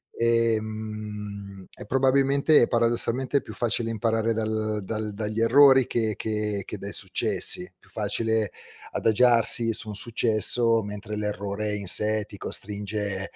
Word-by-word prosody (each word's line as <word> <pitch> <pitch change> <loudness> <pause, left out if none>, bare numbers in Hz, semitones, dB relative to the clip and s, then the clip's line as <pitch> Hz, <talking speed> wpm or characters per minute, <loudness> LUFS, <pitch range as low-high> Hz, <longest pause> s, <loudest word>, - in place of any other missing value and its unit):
Ehm, 110 -3 -4
e - - -11
probabilmente 135 +3 +2
é 120 - +2
paradossalmente 120 +3 -1
più - - -12
facile 115 -1 -1
imparare 115 0 -1
dal 110 -1 -3
dal 110 +1 -5
dagli 105 +1 -4
errori 130 +2 +5
che 110 -2 -2
che 105 -2 -4
che - - -8
dai - - -7
successi. - - +3
Più - - -25
facile 110 -3 -2 0.4
adagiarsi 115 0 +3
su 110 - 0
un 105 - -7
successo 115 +1 +3
mentre 105 +1 -8
l'errore 105 0 -4
in 100 -2 -6
sé 105 +3 +3
ti 100 - -13
costringe 100 -1 -2
110 Hz, 130 wpm, -24 LUFS, 105-115 Hz, 0.4 s, errori